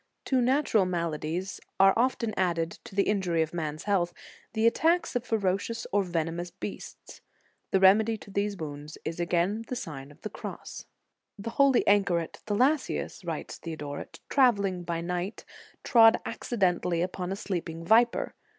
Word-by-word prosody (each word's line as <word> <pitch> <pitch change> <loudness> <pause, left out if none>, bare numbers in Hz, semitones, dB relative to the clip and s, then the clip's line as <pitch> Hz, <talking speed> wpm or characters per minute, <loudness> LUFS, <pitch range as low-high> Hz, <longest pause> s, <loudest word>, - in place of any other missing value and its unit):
To 260 -2 +2
natural 250 -5 +3
maladies 170 +1 -3 0.2
are 195 0 +7
often 235 -2 +1
added, 170 -3 0
to - - -11
the 200 - +4
injury 180 -5 +1
of 160 - -7
man 155 -3 -2
s 155 - -10
health, 185 -4 +1 0.4
the 220 0 +1
attacks 325 +7 +2
of 245 - 0
ferocious 220 0 -1
or 205 - +3
venomous 170 -1 -2
beasts. - - -9 0.5
The 190 - +3
remedy 215 +4 +5
to 200 - -13
those 200 0 -1
wounds 150 -1 -7
is 165 +1 -4
again 175 +5 0
the 255 - -3
Sign 140 - -6
of 145 +1 -17
the 215 - -5
Cross. - - -8 0.5
"The 205 +3 -5
holy 275 0 +4
anchoret 195 -5 +2
Thalassius," 260 +8 0
writes - - -5
Theodoret, 150 -4 -7
"travelling 200 -9 +3
by 170 -1 -3
night, 180 +4 -4 0.4
trod 225 -3 +6
acci 240 +1 -5
dently 180 -3 +2
upon 180 0 -4
a - - -1
sleeping 165 -4 -4
viper. 235 +4 +3
190 Hz, 155 wpm, -28 LUFS, 170-225 Hz, 0.5 s, are